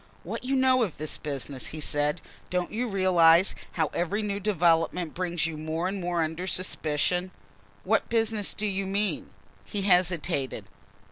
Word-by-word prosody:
"What - - -5
you 265 +2 0
know 260 -1 +4
of 200 -9 -1
this 155 0 -3
business," 140 -2 -3
he 155 - -5
said. 150 +2 0 0.3
"Don't 180 -1 -1
you 240 +3 -1
realise 185 -3 +5 0.2
how 160 -3 0
every 195 +5 -1
new 200 -1 -2
development 170 -4 +1
brings 175 -2 -1
you 165 -2 -3
more 160 +3 -2
and 195 0 -3
more 175 -1 0
under 160 +3 -4
suspicion?" 180 0 0 0.5
"What 215 +3 +1
business 225 -3 0
do 215 - -2
you 195 -1 -1
mean?" 200 +1 -1 0.3
He 205 -2 -4
hesitated. 175 -7 +1
180 Hz, 155 wpm, -27 LUFS, 160-200 Hz, 0.5 s, realise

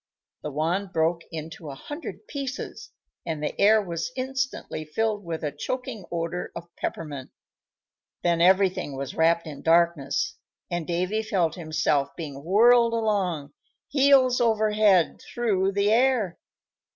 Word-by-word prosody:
The 150 - -4
wand 175 +7 -1
broke 165 +1 +1
into 160 -1 -7
a 140 - -7
hundred 295 - -8
pieces, 275 -5 -6 0.3
and 155 -2 -4
the - - -1
air 215 +2 +6
was 170 +5 -4
instantly 260 -9 -3
filled 210 +6 -1
with 165 -2 -5
a 150 - -1
choking 230 - -5
odor 170 +1 -3
of 170 0 -9
peppermint; 145 -5 -5 0.9
then 170 -1 +2
everything 185 -5 +3
was 135 -1 -4
wrapped 165 +1 +2
in 145 -3 -8
darkness, 165 -4 +2 0.3
and 175 -2 -2
Davy 180 +5 0
felt 185 -7 0
himself 155 -4 0
being 140 -4 -7
whirled 230 +6 +5
along, 190 -10 -1 0.4
heels 270 -3 +4
over 220 -2 +2
head, 205 -5 +3
through 195 -5 0
the 200 +1 +2
air. 235 -6 +2
180 Hz, 135 wpm, -26 LUFS, 160-220 Hz, 0.9 s, air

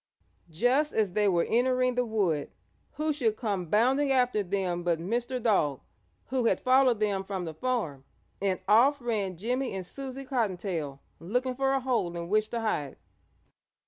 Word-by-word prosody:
Just 250 - +1
as 215 -4 +1
they 210 +2 +2
were 175 -3 +2
entering 255 +1 +2
the 250 0 +1
wood 195 -11 0 0.4
who 305 0 -1
should 235 -7 0
come 200 -7 -2
bounding 260 - +3
after 250 -4 +2
them 185 -2 -2
but 170 -1 +1
Mr. 240 +9 -2
Dog, 190 - +1 0.5
who 255 -2 0
had - - +2
followed 255 -3 +4
them 200 -3 0
from 190 -2 -4
the 160 - -5
farm, 165 - -2 0.4
and 195 -2 0
off 260 +7 +5
ran 210 -7 -2
Jimmie 245 +4 -2
and 190 -1 -4
Susie 270 +5 -7
Cottontail 185 - -2 0.2
looking 250 +9 -1
for 270 +1 +1
a 270 - +2
hole 235 -10 -1
in 170 0 -5
which 215 +1 +2
to 235 - -3
hide. 150 -11 -2
220 Hz, 165 wpm, -28 LUFS, 185-255 Hz, 0.5 s, off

